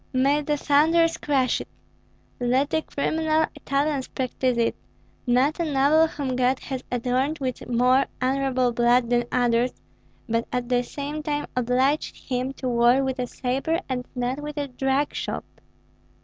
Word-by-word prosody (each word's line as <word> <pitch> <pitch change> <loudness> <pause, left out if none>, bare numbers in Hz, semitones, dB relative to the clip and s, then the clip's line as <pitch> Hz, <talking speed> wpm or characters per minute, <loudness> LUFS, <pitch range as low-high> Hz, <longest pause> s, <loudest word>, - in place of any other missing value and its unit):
"May 275 +3 +3
the 295 0 -1
thunders 325 +4 +3
crush 270 -4 +1
it! - - -9 0.7
Let 255 +4 +1
the 320 - +1
criminal 315 +1 0
Italians 280 -1 -1
practise 255 -1 -1
it, 230 -1 +1 0.5
not 260 +7 +2
a 330 -3 -1
noble 290 +4 +4
whom 275 -5 -3
God 255 +1 +2
has 260 -1 -6
adorned 255 +5 0
with 255 -4 -4
more 250 +3 +3
honorable 260 -1 +1
blood 240 0 +2
than 240 0 +2
others, 245 0 +2 0.5
but 230 0 -1
at 250 -1 -2
the 245 -1 +3
same 290 +4 -5
time 295 -1 -2
obliged 255 +4 +1
him 255 0 -3
to 265 - -5
war 240 +2 +4
with 265 0 -2
a 250 - -1
sabre 270 +8 -1
and 250 -2 -3
not 250 +3 -2
with 300 0 -6
a 285 -1 -2
drug 270 +3 0
shop." - - -4
265 Hz, 155 wpm, -24 LUFS, 250-290 Hz, 0.7 s, noble